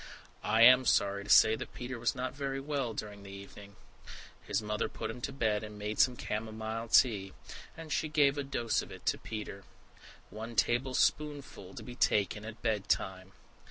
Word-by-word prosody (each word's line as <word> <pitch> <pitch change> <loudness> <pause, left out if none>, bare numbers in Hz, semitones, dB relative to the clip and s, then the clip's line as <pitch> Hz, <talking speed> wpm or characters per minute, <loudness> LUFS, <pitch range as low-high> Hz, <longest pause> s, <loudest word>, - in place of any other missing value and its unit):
I 115 +1 +3
am 125 +1 +8
sorry 100 -1 +2
to 105 - -12
say 110 +1 +7
that - - -8
Peter 125 0 -5
was 120 - 0
not 130 0 -3
very 135 -1 -3
well 135 -5 -2
during 105 -1 -6
the 100 - -11
evening. 100 +1 -11 0.7
His - - -1
mother 105 -1 -2
put - - -5
him 120 +2 -10
to 140 - -3
bed, 110 -6 0
and 105 -1 -8
made 105 +1 -4
some 125 - +5
camomile 110 +1 -4
tea; 100 -5 +3 0.4
and 160 -2 -5
she 155 - 0
gave 145 -2 +3
a 145 - -2
dose 120 -4 0
of - - -10
it - - -11
to - - +1
Peter! 105 -2 -7 0.7
"One 115 +2 -7
table 125 +3 +1
spoonful 145 -10 -1
to - - -8
be 125 - -8
taken 105 -3 +1
at 115 0 -9
bed 110 -4 -1
time." 95 0 -1
110 Hz, 190 wpm, -32 LUFS, 105-130 Hz, 0.7 s, am